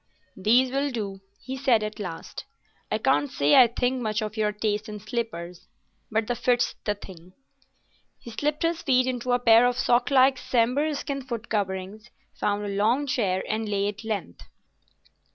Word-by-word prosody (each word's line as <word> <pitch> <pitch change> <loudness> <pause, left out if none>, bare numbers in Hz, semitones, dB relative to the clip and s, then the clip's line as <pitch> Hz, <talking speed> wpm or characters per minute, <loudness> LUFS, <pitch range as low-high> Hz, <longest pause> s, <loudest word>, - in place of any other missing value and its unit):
"These 240 +6 +3
will 275 +2 0
do," 200 -6 -5 0.2
he 260 +2 -6
said 260 -5 +2
at 215 +1 -5
last; 175 -5 -7 0.5
"I - - +2
can't 145 0 +1
say 145 +1 +2
I 255 -2 +8
think 245 +2 -1
much 215 -1 -1
of 215 0 -5
your 215 -1 +1
taste 210 +1 -2
in 210 0 -6
slippers, 205 -6 -5 0.4
but 220 0 +1
the 245 - -1
fit's 245 +1 +1
the 210 - 0
thing." 185 -3 -13 0.8
He 235 - -11
slipped 295 +7 -2
his 335 0 0
feet 255 -2 +3
into 250 -1 -2
a 245 - +4
pair 235 0 +6
of 245 0 -1
sock 245 -1 +2
like 265 -1 +4
sambhur 255 +6 +1
skin 275 0 -4
foot 240 -3 -6
coverings, 200 +1 -3 0.2
found 205 0 -1
a - - -3
long 220 +8 +1
chair, 200 -8 0
and 215 0 -2
lay 200 -1 0
at 205 +2 -8
length. 205 - -4
225 Hz, 175 wpm, -26 LUFS, 205-250 Hz, 0.8 s, I